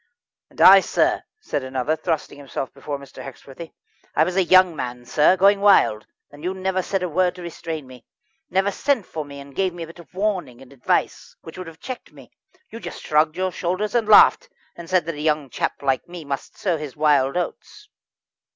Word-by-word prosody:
"And - - -19
I, - - +10
sir," - - +1 0.2
said 145 - -3
another, 130 +3 -1
thrusting 160 -3 -3
himself 135 -1 -6
before 145 -1 -5
Mr. 140 -1 -12
Hexworthy 140 +4 -11 0.4
"I 155 - +5
was 180 +2 -2
a 190 - +3
young 185 -1 +5
man, 125 -3 -6
sir, 155 +8 +3
going 200 +2 +5
wild, 190 - +4 0.2
and 145 +1 -14
you 185 +2 -2
never 190 0 -1
said 190 0 -2
a - - 0
word 180 +2 +1
to 180 - -10
restrain 165 -3 -6
me; 130 -2 -14 0.5
never 190 +2 +1
sent 250 0 0
for 155 - -5
me 140 -1 -11
and 140 -1 -13
gave 185 -2 0
me 170 - -6
a - - -5
bit 165 +2 -14
of 170 - -15
warning 185 - -2
and 135 0 -15
advice 130 - -2
which 160 - -11
would 185 -1 -8
have 160 0 -12
checked 255 -1 -8
me. - - -16 0.4
You 230 - -8
just - - -8
shrugged 155 +1 +2
your 185 0 -1
shoulders 185 +5 -2
and 235 -3 +1
laughed, 485 - +6 0.3
and 170 -1 -10
said 185 -4 +2
that 165 - -3
a 150 - -7
young 150 -4 0
chap - - -3
like 135 -2 0
me 175 -3 -9
must 140 -1 -6
sow 180 -5 0
his 150 -4 -7
wild 145 -1 +2
oats." 420 - -5
165 Hz, 210 wpm, -22 LUFS, 140-185 Hz, 0.5 s, I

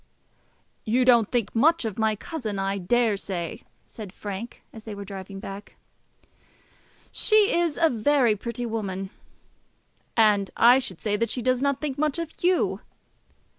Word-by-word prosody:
"You 245 +3 +2
don't 235 -4 +5
think 235 -5 0
much 310 +5 +3
of 220 -1 -4
my 220 -1 +2
cousin, 220 - -5
I 195 +1 -1
daresay," 200 -2 -1 0.2
said 210 -4 -9
Frank, 205 +3 -7
as 220 - -11
they 215 -2 -7
were 200 0 -7
driving 195 0 -8
back. 195 0 -9 1.4
"She 430 -2 +3
is 340 -3 +1
a 330 - +5
very 245 -2 +2
pretty 235 +3 -5
woman." 195 -4 -4 1.1
"And 205 -3 +4
I 245 +3 +7
should 190 -10 -5
say 210 -1 0
that 230 +1 0
she 245 +1 -3
does 255 0 +1
not 280 -1 0
think 285 -3 -3
much 305 0 +1
of 335 -1 -4
you." 330 - +2
225 Hz, 150 wpm, -25 LUFS, 200-260 Hz, 1.4 s, I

